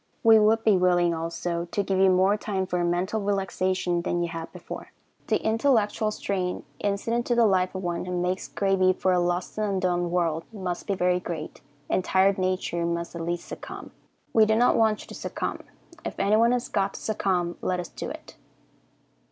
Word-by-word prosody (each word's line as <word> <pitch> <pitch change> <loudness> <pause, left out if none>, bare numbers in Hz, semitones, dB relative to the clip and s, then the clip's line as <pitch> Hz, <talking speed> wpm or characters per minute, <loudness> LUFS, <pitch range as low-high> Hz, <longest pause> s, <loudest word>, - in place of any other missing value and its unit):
We 225 -1 +7
would 220 +1 +3
be 210 -3 +5
willing, 175 -1 +3
also, 170 +1 -3
to 200 +4 -2
give 190 -1 0
you 190 0 +6
more 185 +2 +4
time 200 -3 -2
for 180 -1 -1
mental 180 +5 0
relaxation 185 -3 0
than 175 0 -1
you 170 - -2
had 165 0 -6
before. - - -9 0.4
The - - +2
intellectual 220 -2 +2
strain 190 -3 -2 0.2
incident 230 +4 -1
to 240 - +2
the 235 -1 +5
life 185 -2 +2
of 190 - -4
one 175 0 -2
who 180 -1 -2
makes 180 +1 -1
gravy 195 -2 +2
for 185 0 0
a 180 - +3
lost 175 +3 -1
and 215 - +1
undone 180 -2 0
world 165 -2 0
must 185 -5 -4
be 200 - 0
very 180 0 +2
great, 165 -3 -6 0.3
and 185 - +1
tired 190 +1 +3
nature 185 -2 -1
must 170 0 -2
at 170 - -4
last 170 +1 -2
succumb. - - -8 0.4
We 220 -1 +5
do 220 - +3
not 240 +2 +4
want 220 -2 +2
you - - -12
to - - -8
succumb. - - -4 0.4
If - - -5
anyone 220 +4 +4
has 250 0 0
got 195 -1 -1
to - - -6
succumb, 185 -5 -1
let 180 -1 -1
us 175 - -5
do - - -6
it. - - -10
185 Hz, 195 wpm, -26 LUFS, 175-205 Hz, 0.4 s, We